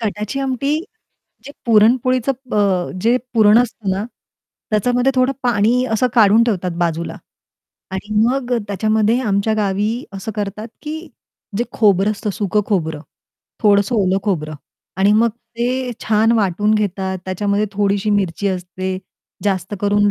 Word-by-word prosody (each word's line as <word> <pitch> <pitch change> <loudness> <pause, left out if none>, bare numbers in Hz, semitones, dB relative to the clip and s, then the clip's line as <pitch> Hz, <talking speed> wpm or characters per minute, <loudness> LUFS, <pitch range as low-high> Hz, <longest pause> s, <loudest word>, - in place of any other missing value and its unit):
कटाची 210 +3 -3
आमटी 275 +3 0 0.7
जे 285 - -9
पुरणपोळीचं 245 +4 +3 0.2
ब - - -2 0.5
जे 235 +3 +4 0.2
पुरण 215 0 +6
असतं 235 -4 -1
ना, 190 +2 -1 0.7
त्याच्यामध्ये 245 +5 +2
थोडं 255 +1 +2
पाणी 240 +1 +2
असं 235 +3 +2
काढून 220 -1 +6
ठेवतात 185 -6 -1
बाजूला 170 -1 -1 0.7
आणि 200 +3 -5
मग 250 0 0
अ, - - +1
त्याच्यामध्ये 215 +4 +1
आमच्या 210 -1 +1
गावी 210 +3 -1
असं 195 +3 -6
करतात, 210 +2 -4
की 315 +2 -6 0.5
जे 240 - +1
खोबरं 205 -2 +3
असतं 210 0 -3
सुकं 210 +1 0
खोबरं, 160 -7 -1 0.6
थोडंसं 205 +2 +3
ओलं 190 -2 +2
खोबरं 155 -7 -2 0.4
आणि 195 +2 +4
मग 225 +2 +4 0.3
ते 250 +1 -1
छान 220 +1 +3
वाटून 210 -1 +2
घेतात, 190 -2 -1
त्याच्यामध्ये 200 +2 0
थोडीशी 200 0 0
मिरची 200 -1 0
असते, 185 0 -4 0.5
जास्त 190 0 -1
करून 205 0 +3
210 Hz, 135 wpm, -19 LUFS, 195-235 Hz, 0.7 s, पुरण